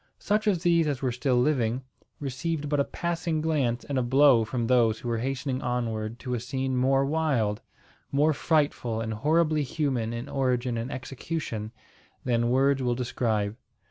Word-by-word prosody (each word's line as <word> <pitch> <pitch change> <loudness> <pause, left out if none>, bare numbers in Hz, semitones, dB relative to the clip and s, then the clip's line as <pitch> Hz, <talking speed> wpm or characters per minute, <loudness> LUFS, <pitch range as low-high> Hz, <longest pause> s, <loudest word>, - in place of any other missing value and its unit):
Such 215 +2 0
of 185 -5 +2
these 170 -3 +3
as 140 -2 -2
were 130 - +1
still 125 +2 0
living, 125 -3 +1 0.4
received 145 +2 -3
but 145 -1 +1
a - - +4
passing 170 0 -2
glance 140 -7 0
and 140 -2 -1
a - - +2
blow 130 -1 +5
from 120 +1 -2
those 115 -2 +3
who 120 - -8
were 115 -1 0
hastening 130 +1 -2
onward 115 -2 -2
to 125 -2 -4
a 120 - 0
scene 130 +2 -2
more 135 +2 +3
wild 135 -9 0 0.5
more 150 +3 +3
frightful 145 -8 0
and 110 -1 -3
horribly 155 +6 +2
human 130 -5 -1
in 120 +3 -5
origin 125 -3 0
and 115 +3 -3
execution 130 -4 -5 0.5
than 120 -1 +1
words 135 +2 +3
will 125 -1 +1
describe. 115 -4 -1
130 Hz, 170 wpm, -27 LUFS, 120-145 Hz, 0.5 s, blow